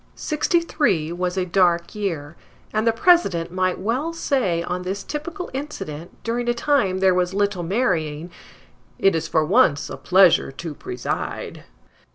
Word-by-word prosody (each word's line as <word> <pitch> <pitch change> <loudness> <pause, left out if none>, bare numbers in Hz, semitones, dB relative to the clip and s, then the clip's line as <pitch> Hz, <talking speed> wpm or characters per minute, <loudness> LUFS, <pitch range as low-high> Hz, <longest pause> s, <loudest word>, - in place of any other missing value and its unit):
Sixty 335 +3 0
three 190 - 0
was 180 +1 -2
a 185 - +1
dark 175 -2 +2
year, 170 -8 -4 0.4
and 215 +1 0
the - - +6
President 225 - +3
might 185 0 0
well 250 - -2
say 240 - 0
on 180 +1 -3
this 190 +2 -4
typical 340 - -6
incident, 190 - -7
during 240 +1 -1
a 240 - +1
time 235 -8 +1
there 190 -1 +5
was 180 +1 0
little 200 -2 0
marrying, 170 -5 -1 0.7
it 195 -3 +3
is 165 0 -2
for 155 -1 +1
once 175 - +3
a - - -6
pleasure 185 -6 +4
to 165 +2 -6
preside. 125 -3 -5
190 Hz, 155 wpm, -22 LUFS, 170-240 Hz, 0.7 s, the